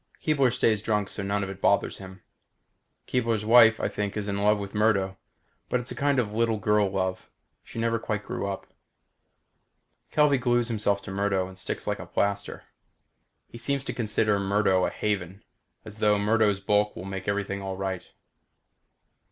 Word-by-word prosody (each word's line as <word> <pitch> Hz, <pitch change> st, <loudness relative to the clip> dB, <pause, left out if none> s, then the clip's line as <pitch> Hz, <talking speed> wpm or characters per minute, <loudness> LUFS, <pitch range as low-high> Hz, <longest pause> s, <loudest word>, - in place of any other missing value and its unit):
Keebler 140 Hz, -5 st, +2 dB
stays 110 Hz, -2 st, +2 dB
drunk 105 Hz, -3 st, 0 dB
so -, -, -5 dB
none 100 Hz, +1 st, -1 dB
of 95 Hz, -, -4 dB
it 95 Hz, 0 st, -11 dB
bothers 100 Hz, -, +2 dB
him. 95 Hz, -1 st, -11 dB, 0.8 s
Keebler's 115 Hz, -4 st, 0 dB
wife, 115 Hz, 0 st, +7 dB
I -, -, 0 dB
think, 105 Hz, 0 st, -3 dB
is 105 Hz, -1 st, -3 dB
in 100 Hz, -1 st, -2 dB
love 105 Hz, +1 st, +3 dB
with 100 Hz, -1 st, -6 dB
Murdo 100 Hz, -3 st, +2 dB, 0.5 s
but 125 Hz, -, +1 dB
it's 120 Hz, +2 st, -7 dB
a -, -, -5 dB
kind 145 Hz, -1 st, +1 dB
of 110 Hz, -4 st, 0 dB
little 115 Hz, 0 st, +1 dB
girl 105 Hz, 0 st, +2 dB
love. 95 Hz, -1 st, -3 dB, 0.3 s
She -, -, -12 dB
never 115 Hz, 0 st, 0 dB
quite 105 Hz, -2 st, -3 dB
grew -, -, -3 dB
up. 100 Hz, -1 st, -5 dB, 1.4 s
Kelvey 150 Hz, -3 st, +3 dB
glues 120 Hz, -1 st, +1 dB
himself 105 Hz, -3 st, 0 dB
to -, -, -7 dB
Murdo 95 Hz, -1 st, 0 dB
and 95 Hz, -, -12 dB
sticks 95 Hz, -, -5 dB
like -, -, -2 dB
a -, -, -8 dB
plaster. 100 Hz, 0 st, -2 dB, 0.8 s
He 115 Hz, -, -10 dB
seems 140 Hz, +3 st, -1 dB
to -, -, -4 dB
consider 105 Hz, -2 st, +1 dB
Murdo 100 Hz, -2 st, +2 dB
a -, -, -1 dB
haven, 100 Hz, -2 st, -3 dB, 0.4 s
as 105 Hz, 0 st, -10 dB
though 105 Hz, -1 st, +3 dB
Murdo's 105 Hz, -1 st, +2 dB
bulk 105 Hz, +1 st, +1 dB
will 90 Hz, -, -7 dB
make 95 Hz, -1 st, -6 dB
everything 100 Hz, -1 st, -2 dB
all 95 Hz, -1 st, -5 dB
right. 95 Hz, -1 st, -4 dB
105 Hz, 175 wpm, -26 LUFS, 100-115 Hz, 1.4 s, wife